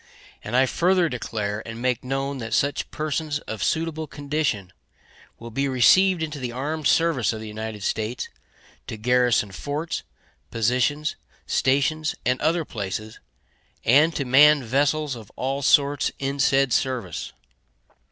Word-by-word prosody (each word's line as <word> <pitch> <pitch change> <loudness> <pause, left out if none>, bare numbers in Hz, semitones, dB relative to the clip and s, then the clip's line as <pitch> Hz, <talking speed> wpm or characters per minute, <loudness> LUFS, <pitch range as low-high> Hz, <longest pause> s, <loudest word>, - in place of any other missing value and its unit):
And - - -4
I 130 +1 +5
further 175 +4 +2
declare 110 -4 -3
and 115 0 -8
make 125 0 -1
known 135 +1 -2
that 115 -1 -2
such 140 +1 0
persons 155 0 -2
of 110 -3 -7
suitable 160 -1 -1
condition 140 - -2 0.6
will 115 0 -10
be 140 +4 0
received 165 +8 +4
into 155 -2 -4
the 125 -2 -4
armed 145 +5 -2
service 160 -9 +2
of 110 - -6
the 110 - -7
United 110 -1 -6
States 110 +5 -2 0.6
to 110 - -6
garrison 125 -2 +2
forts, 145 - -4 0.5
positions, 125 +7 0 0.3
stations, 150 +4 +1
and 125 +1 +1
other 165 +1 +1
places, 110 0 -5 0.7
and 150 +7 +5
to 140 - -1
man 145 +3 +6
vessels 145 +3 0
of 110 -4 -11
all 135 +2 -2
sorts 140 +1 +3
in 140 +1 -3
said 135 -1 +3
service. 120 -11 -2
135 Hz, 140 wpm, -24 LUFS, 115-150 Hz, 0.7 s, man